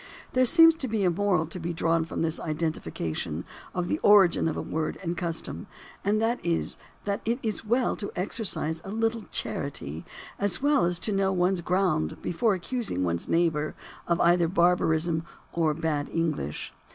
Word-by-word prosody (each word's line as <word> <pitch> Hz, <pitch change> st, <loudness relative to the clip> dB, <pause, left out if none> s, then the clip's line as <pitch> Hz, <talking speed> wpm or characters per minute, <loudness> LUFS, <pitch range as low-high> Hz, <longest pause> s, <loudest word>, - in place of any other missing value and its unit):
There 255 Hz, 0 st, +4 dB
seems 330 Hz, +3 st, +8 dB
to 270 Hz, -, -2 dB
be 215 Hz, -3 st, 0 dB
a 180 Hz, -, +3 dB
moral 180 Hz, -3 st, +1 dB
to 165 Hz, +3 st, -7 dB
be 170 Hz, 0 st, -3 dB
drawn 165 Hz, 0 st, +1 dB
from 165 Hz, -, -3 dB
this 160 Hz, 0 st, 0 dB
identification 85 Hz, -, -3 dB, 0.3 s
of 180 Hz, -1 st, -2 dB
the 305 Hz, -, -1 dB
origin 195 Hz, -5 st, +5 dB
of 160 Hz, -, -2 dB
a -, -, -1 dB
word 155 Hz, -1 st, -2 dB
and 170 Hz, -1 st, -2 dB
custom, 170 Hz, +4 st, -2 dB, 0.4 s
and 210 Hz, +2 st, +2 dB
that 230 Hz, +2 st, 0 dB
is 170 Hz, -1 st, -1 dB, 0.3 s
that 200 Hz, 0 st, -1 dB
it 230 Hz, +2 st, 0 dB
is 220 Hz, -2 st, -2 dB
well 240 Hz, +3 st, +1 dB
to 205 Hz, -, -4 dB
exercise 180 Hz, -5 st, -1 dB
a -, -, -8 dB
little 225 Hz, +1 st, -1 dB
charity 80 Hz, -, -4 dB, 0.4 s
as 200 Hz, -2 st, +1 dB
well 285 Hz, -5 st, +3 dB
as 175 Hz, 0 st, +1 dB
to 210 Hz, -, -1 dB
know 195 Hz, -1 st, +2 dB
one's 180 Hz, 0 st, +1 dB
ground 180 Hz, -, 0 dB
before 210 Hz, +4 st, +1 dB
accusing 190 Hz, -, -2 dB
one's 85 Hz, -1 st, -1 dB
neighbor 160 Hz, -3 st, +1 dB, 0.3 s
of 170 Hz, 0 st, +1 dB
either 170 Hz, 0 st, +4 dB
barbarism 170 Hz, -2 st, +2 dB, 0.3 s
or 160 Hz, -3 st, +1 dB
bad 155 Hz, -3 st, -1 dB
English. 155 Hz, -, -2 dB
175 Hz, 175 wpm, -27 LUFS, 160-205 Hz, 0.4 s, seems